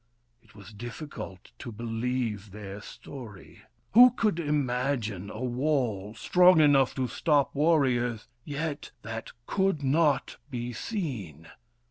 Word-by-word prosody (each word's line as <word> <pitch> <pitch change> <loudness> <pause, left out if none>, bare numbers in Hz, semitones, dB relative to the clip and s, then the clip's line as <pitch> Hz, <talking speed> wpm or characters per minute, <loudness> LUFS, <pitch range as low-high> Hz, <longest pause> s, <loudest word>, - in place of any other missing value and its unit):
It - - -24
was 105 0 -12
difficult 115 - -8
to 120 - -7
believe 115 -2 -3
their 100 0 -8
story. 110 -3 -11 0.3
Who 245 +4 +10
could 215 -7 0
imagine 125 - -1
a 110 +4 -6
wall, 120 -6 -1
strong 180 +9 +5
enough 140 -4 +5
to 130 -2 0
stop 145 +3 +1
warriors, 130 -7 +2 0.2
yet 145 0 -4
that 115 +1 -6
could 190 -6 0
not 145 +1 +2
be 120 -2 -4
seen 110 - -5
125 Hz, 115 wpm, -28 LUFS, 110-150 Hz, 0.3 s, Who